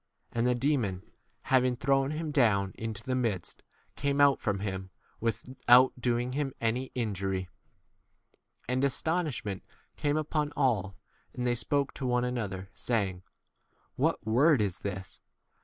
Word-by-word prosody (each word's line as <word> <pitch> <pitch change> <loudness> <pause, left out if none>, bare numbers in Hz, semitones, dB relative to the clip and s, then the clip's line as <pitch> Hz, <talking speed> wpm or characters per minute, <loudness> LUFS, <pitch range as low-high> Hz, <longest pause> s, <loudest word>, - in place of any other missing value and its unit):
And 120 +1 +1
the 125 - +3
demon, 120 -8 0 0.4
having 130 -1 +3
thrown 135 +1 +2
him 155 +1 -3
down 105 -9 +3
into 110 -2 -5
the 130 - -2
midst, 115 -8 -2 0.3
came 140 0 0
out 140 -1 +5
from 105 -2 0
k 100 - -6
him 95 -2 -4 0.3
without 125 +2 +4
doing 120 0 0
36 140 +3 -1
him 135 - -9
any 115 +3 0
injury. 95 -5 -2 1.2
And 130 +2 0
astonishment 140 - -1 0.4
came 145 0 +1
upon 150 -1 -1
all, 105 -9 +1 0.4
and 125 0 -2
they 120 - +3
spoke 140 +3 0
to 130 - -4
one 125 0 +2
another, 100 -6 -3
saying, 100 -7 -1 0.7
What - - 0
word 130 +6 +4
[is] 100 -4 -1
this 95 -2 -6
125 Hz, 140 wpm, -30 LUFS, 100-135 Hz, 1.2 s, out